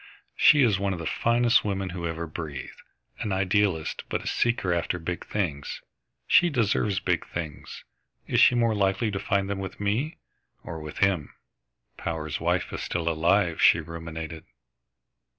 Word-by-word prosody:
"She 145 -3 +6
is 105 -6 +3
one 100 -1 0
of - - -4
the 85 - -5
finest 120 +6 +3
women 95 -2 -2
who 85 -1 -4
ever 85 0 -4
breathed, 75 -3 -7 0.4
an 105 - -3
idealist 95 -3 +1
but - - -2
a - - -6
seeker 115 -7 +1
after 85 +1 -1
big 85 +1 -4
things. 80 -9 -3 0.4
She 175 +1 +5
deserves 110 - +1
the - - -2
big - - +1
things. 80 -4 -7 0.4
Is - - +1
she 125 - +7
more 115 -2 +3
likely 100 +1 +1
to 95 - -3
find 100 0 0
them 100 -1 -3
with 95 -1 -6
me 110 +10 -1 0.5
or 80 - -6
with 75 -1 -8
him?" 90 -7 -2 0.6
"Power's 80 -3 -3
wife - - 0
is - - -4
still 85 -1 -2
alive," 85 +2 +2
she - - +6
ruminated. 80 -1 -7
95 Hz, 165 wpm, -26 LUFS, 80-105 Hz, 0.6 s, she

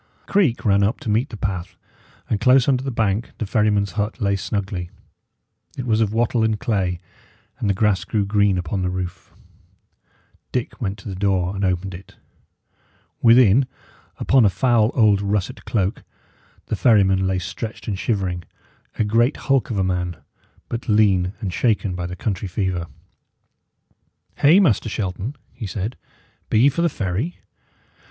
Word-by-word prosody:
A - - -14
creek 170 - +2
ran 100 -1 +4
up 100 +3 +1
to 110 - -2
meet 115 +6 +1
the 110 - -8
path, 95 -3 -4 0.5
and 105 - 0
close 130 0 +5
under 130 -2 +2
the 135 - -2
bank 110 -2 -1
the 110 - -3
ferryman's 105 -2 +1
hut 105 +4 -3
lay 100 -3 +1
snugly. 95 -2 -3 0.9
It 130 - -4
was 110 -2 +2
of 105 -2 +1
wattle 115 +1 +1
and 110 -1 +1
clay, 95 -6 -1 0.6
and 105 - -1
the 100 - +2
grass 105 -2 +2
grew 105 -2 -1
green 100 -2 +2
upon 90 +2 -2
the 90 - 0
roof. 90 -1 -5 1.2
Dick 125 -2 -3
went 100 -2 -2
to 100 - -11
the 100 - -4
door 95 -1 0
and 100 - -3
opened 95 0 -1
it. 90 +3 -12 1.1
Within, 120 +1 +6 0.5
upon 135 -3 +3
a 105 - +5
foul 110 +3 +2
old 105 -5 +4
russet 100 -1 -2
cloak, 100 -3 -1 0.6
the - - -2
ferryman 95 -5 +3
lay 95 0 0
stretched 105 +4 -6
and 100 -3 -2
shivering; 95 -6 -1 0.6
a - - +2
great 115 +6 +2
hulk 135 -3 +1
of 110 - -2
a 95 - +2
man, 90 -2 -2 0.5
but 115 0 -5
lean 100 -4 +3
and 95 -5 -3
shaken 105 -4 +1
by 90 -1 -4
the 90 - -6
country 100 -1 -3
fever. 90 -2 -2 1.5
"Hey, 160 +7 +6
Master 125 - +2
Shelton," 105 +5 -3 0.2
he 115 -4 -6
said, 100 +5 -4 0.5
"be 110 - +3
ye 135 - +6
for 170 - -2
the 170 - +3
ferry? 110 - -3
105 Hz, 165 wpm, -22 LUFS, 95-115 Hz, 1.5 s, Within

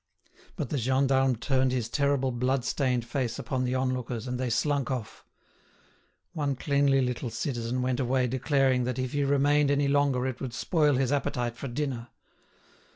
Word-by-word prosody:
But - - -4
the 145 - -1
gendarme 130 +1 +2
turned 130 +2 +1
his 125 -3 -1
terrible 140 0 +1
blood 125 +1 0
stained 125 -4 0
face 120 -1 -2
upon 130 -2 -2
the 125 +1 -1
onlookers, 130 -2 -2
and 125 0 -3
they 130 -1 -1
slunk 140 +2 0
off. 125 -5 -5 1.1
One 145 -3 -1
cleanly 140 0 +2
little 125 -1 -2
citizen 120 +1 -2
went 125 -1 0
away 130 0 +1
declaring 130 0 +1
that 125 -1 -2
if 130 -1 -2
he 145 -1 0
remained 145 +1 +3
any 140 0 +2
longer 140 -3 +2
it 130 -2 -4
would 130 -2 -4
spoil 150 -3 +2
his 130 0 +1
appetite 125 -4 -1
for 135 - -6
dinner. 125 -2 -3
130 Hz, 165 wpm, -28 LUFS, 125-140 Hz, 1.1 s, remained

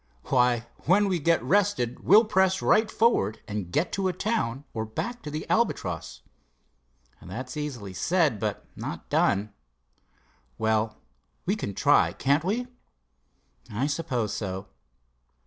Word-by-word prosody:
"Why, 125 -3 +3 0.2
when 200 +5 +4
we 185 -3 0
get 165 +2 +2
rested 195 - +1
we'll 215 +6 +6
press 190 -2 +2
right 220 0 +3
forward 115 - +2
and 100 -4 -4
get 155 - 0
to 195 -1 0
a 185 - 0
town 175 - -1
or 110 - -2
back 235 - -4
to - - -6
the 155 +1 -5
Albatross." 100 - -1 1.0
"That's 125 +4 -7
easily 125 -10 -5
said; 155 - +1
but 105 -1 -3
not - - -6
done." 100 +1 +2 1.0
"Well, 110 0 0 0.5
we 195 - +1
can 100 - -5
try; - - +4
can't 140 +3 +1
we?" 220 +7 -1 1.1
"I 115 +6 -1
suppose 140 -8 -1
so." 95 -1 -4
140 Hz, 130 wpm, -27 LUFS, -, 1.1 s, we'll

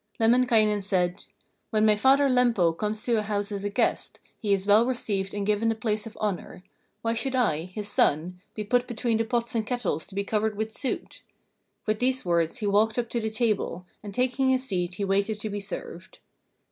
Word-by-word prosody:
Lemminkainen 225 -3 +4
said: 180 -1 -1 0.4
'When 215 -1 +2
my 215 -1 +5
father 270 +6 +4
Lempo 235 -10 +3
comes 210 +3 -3
to 235 -3 +2
a - - 0
house 205 -1 -2
as 200 -1 -4
a 205 - -1
guest, 200 - 0 0.2
he 210 -3 -1
is 195 -1 +2
well 210 +2 +6
received 205 -6 -2
and 205 -1 -3
given 210 +2 +1
the 225 - 0
place 215 0 -2
of 225 - -12
honour. 195 -3 -4 0.4
Why 230 0 +1
should 260 +3 -2
I, 170 -11 +1
his 200 +3 -6
son, 180 +1 +1
be 215 - -3
put 245 +4 +1
between 235 -1 0
the 225 - 0
pots 235 0 -1
and 220 -2 -1
kettles 245 - -2
to 195 - -12
be 200 - 0
covered 215 0 -1
with 220 +1 -2
soot?' 260 - -4 0.6
With 215 0 0
these 255 -1 +1
words 170 -2 +1
he 215 - -4
walked 215 +3 +2
up 235 -1 -1
to 240 - -1
the 220 -1 -2
table, 215 -5 -1 0.2
and 205 - -7
taking 255 +4 +1
his 260 0 +1
seat 180 -3 -1
he 200 - -2
waited 200 +2 0
to 215 - -3
be 205 - -3
served. 185 -2 -7
215 Hz, 210 wpm, -26 LUFS, 200-235 Hz, 0.6 s, well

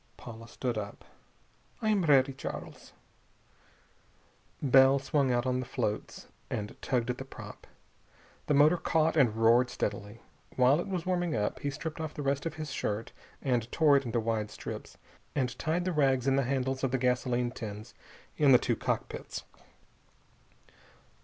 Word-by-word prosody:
Paula 115 -1 -10
stood 120 -2 -3
up. 100 -1 -8 0.7
"I 220 - 0
am 205 -3 +2
ready, 135 -3 +4
Charles." 135 - -8 1.7
Bell 135 0 +6
swung 135 -1 +1
out 120 +1 +1
on 125 0 0
the 130 - -3
floats 110 -5 -3 0.2
and 105 0 -4
tugged 125 -1 0
at 125 - -7
the - - -4
prop. 135 - -11 0.8
The 150 - +3
motor 150 +5 +6
caught 160 -1 +1
and 125 -8 +4
roared 115 +3 +4
steadily. 105 -1 -4 0.4
While 130 +4 +4
it 175 - -3
was 185 -4 -3
warming 175 -4 0
up, 105 -1 -1
he 145 - -2
stripped 155 +3 -5
off 155 -1 -5
the 145 - -4
rest 140 +3 0
of 160 - -6
his 155 -2 -5
shirt 110 -4 -3 0.3
and 120 -3 0
tore 150 -3 +5
it 140 - +3
into 120 -2 -1
wide 110 -2 -1
strips, 105 - -8 0.4
and 125 -3 0
tied 170 +3 0
the 185 - 0
rags 135 -4 +2
in 135 -1 +3
the 135 -1 +2
handles 135 0 -1
of 135 - +2
the 130 - 0
gasoline 125 -1 0
tins 110 -2 -7 0.4
in 145 -3 +6
the - - +9
two - - 0
cockpits. - - -3
130 Hz, 165 wpm, -30 LUFS, 120-145 Hz, 1.7 s, the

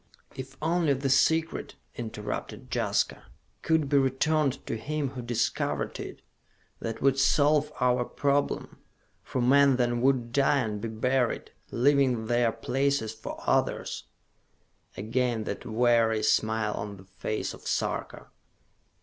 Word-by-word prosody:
"If 130 0 -8
only 165 -2 +2
the 135 0 -1
Secret," 160 +4 +2 0.2
interrupted 105 -3 -6
Jaska, - - 0 0.4
"could 160 -3 +2
be 140 0 +4
returned 140 +1 +1
to - - -3
him 145 +5 -2
who 130 -1 -7
discovered 120 -1 -1
it! - - -8 0.6
That 115 +1 -5
would 135 0 +3
solve 150 +1 +3
our 125 -1 +2
problem, 140 +3 -1 0.4
for 130 - -3
men 140 +1 +5
then 120 -1 0
would 125 -3 +2
die 140 +1 +3
and 105 -3 -3
be 115 - -3
buried, 125 +3 0 0.2
leaving 130 -3 +2
their 120 0 +2
places 125 0 -1
for 110 - -8
others." - - 0 0.9
Again 115 +3 -1
that - - -5
weary 115 -1 +3
smile 110 -1 +1
on 100 -1 -5
the 95 - -15
face 95 +3 -4
of - - -11
Sarka. - - -2
125 Hz, 130 wpm, -28 LUFS, 115-140 Hz, 0.9 s, men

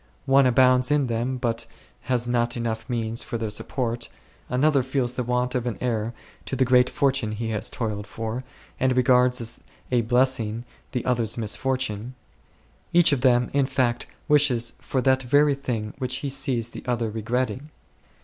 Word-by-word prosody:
One 135 -1 +5
abounds 125 0 +4
in 150 -2 +2
them 120 +2 -2
but 115 -1 -2 0.4
has 120 -2 +1
not 120 0 +1
enough 115 0 -3
means 115 -1 -1
for 125 -4 -4
their 110 -2 -3
support; 120 +2 -3 0.4
another 140 +2 +3
feels 130 -1 -1
the 125 - -2
want 125 +1 0
of 125 -1 -1
an 120 - -3
heir 115 -2 -2 0.3
to - - -2
the 130 0 +2
great 125 0 +4
fortune 135 -8 0
he 110 +1 -3
has 105 - -2
toiled 105 -3 -4
for, 115 +4 -4 0.4
and 130 0 +2
regards 125 0 +4
as 115 0 -5 0.3
a 125 -2 +3
blessing 120 -1 +1 0.3
the 125 -3 -3
other's 120 -3 0
misfortune; 125 0 -2 0.8
each 175 -2 +6
of 140 -3 +1
them, 125 -2 +3
in 140 -1 +2
fact, 125 -3 0 0.2
wishes 140 -6 +3
for 130 -2 -2
that 130 0 +3
very 145 +3 +3
thing 115 -6 -4
which 130 -1 -2
he 140 - -1
sees 125 -4 0
the - - -9
other 120 -3 -1
regretting. 125 +5 -2
125 Hz, 170 wpm, -24 LUFS, 115-130 Hz, 0.8 s, each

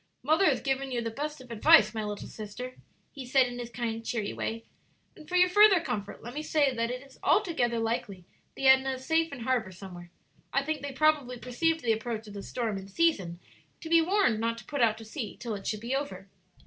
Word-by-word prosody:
"Mother 315 +8 +3
has 270 -8 +3
given 270 0 -1
you 245 - -1
the 230 - -3
best 295 +3 -5
of 250 -2 -13
advice, 215 -1 +6
my 220 -1 -3
little 210 -1 -5
sister," 235 +4 -8 0.4
he 275 - -8
said, 255 +1 +4
in 245 0 -6
his 240 -1 -5
kind, 230 -1 -4
cheery 225 -3 -2
way; 225 0 -4 0.5
"and 305 - -14
for 360 - -2
your 360 0 +6
further 405 0 +6
comfort 205 -10 -5
let 240 +2 -7
me 300 - -3
say 295 -3 +2
that 230 -1 -1
it 250 +2 -5
is 270 - -19
altogether 320 - +2
likely 225 -5 -3 0.3
the 270 - -4
Edna 265 0 +5
is 260 0 -8
safe 325 0 +2
in 275 -3 -7
harbor 230 -5 0
somewhere. 175 -2 -10 0.4
I 275 - +1
think 310 +1 -3
they 285 0 -5
probably 280 -3 +2
perceived 320 +7 0
the 230 -2 +2
approach 220 0 -4
of 205 - -10
the 200 - -6
storm 220 -2 -3
in 195 - -10
season 195 - 0 0.4
to 320 - -8
be 335 0 +6
warned 370 - +2
not 230 +1 -1
to - - -11
put 285 -3 -3
out 220 -2 +3
to 225 - -10
sea 220 -1 -6
till 235 -1 -5
it 200 -1 -6
should 215 -1 -2
be 240 +4 -2
over." 195 -9 -4
245 Hz, 230 wpm, -29 LUFS, 220-290 Hz, 0.5 s, advice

